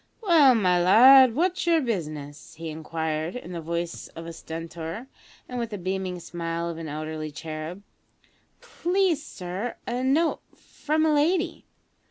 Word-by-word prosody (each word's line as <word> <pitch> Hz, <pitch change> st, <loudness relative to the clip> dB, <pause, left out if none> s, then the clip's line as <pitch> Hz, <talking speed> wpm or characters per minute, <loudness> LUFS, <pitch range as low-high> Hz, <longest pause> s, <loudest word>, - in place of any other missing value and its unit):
"Well, 310 Hz, -, +6 dB
my 180 Hz, -5 st, +3 dB
lad, 245 Hz, +6 st, +8 dB
what's 355 Hz, +3 st, 0 dB
your 335 Hz, -1 st, +5 dB
business?" 155 Hz, -, -5 dB
he 165 Hz, 0 st, -6 dB
inquired 160 Hz, +1 st, -3 dB
in 215 Hz, -8 st, -7 dB
the 170 Hz, -2 st, -5 dB
voice 170 Hz, +1 st, -4 dB
of 165 Hz, -, -7 dB
a 165 Hz, -, -7 dB
stentor, 165 Hz, +6 st, -7 dB, 0.4 s
and 250 Hz, -1 st, -5 dB
with 235 Hz, -1 st, -2 dB
the 210 Hz, -, -5 dB
beaming 185 Hz, 0 st, -3 dB
smile 170 Hz, 0 st, -4 dB
of 165 Hz, -1 st, -6 dB
an 160 Hz, -2 st, -6 dB
elderly 155 Hz, +1 st, -5 dB
cherub. 155 Hz, +4 st, -7 dB, 0.8 s
"Please, 355 Hz, -4 st, 0 dB
sir, 190 Hz, 0 st, -5 dB
a 245 Hz, +1 st, -2 dB
note 305 Hz, +5 st, +2 dB
from 310 Hz, +1 st, -2 dB
a 310 Hz, -, +3 dB
lady." 330 Hz, +4 st, +1 dB
180 Hz, 150 wpm, -26 LUFS, 165-270 Hz, 0.8 s, lad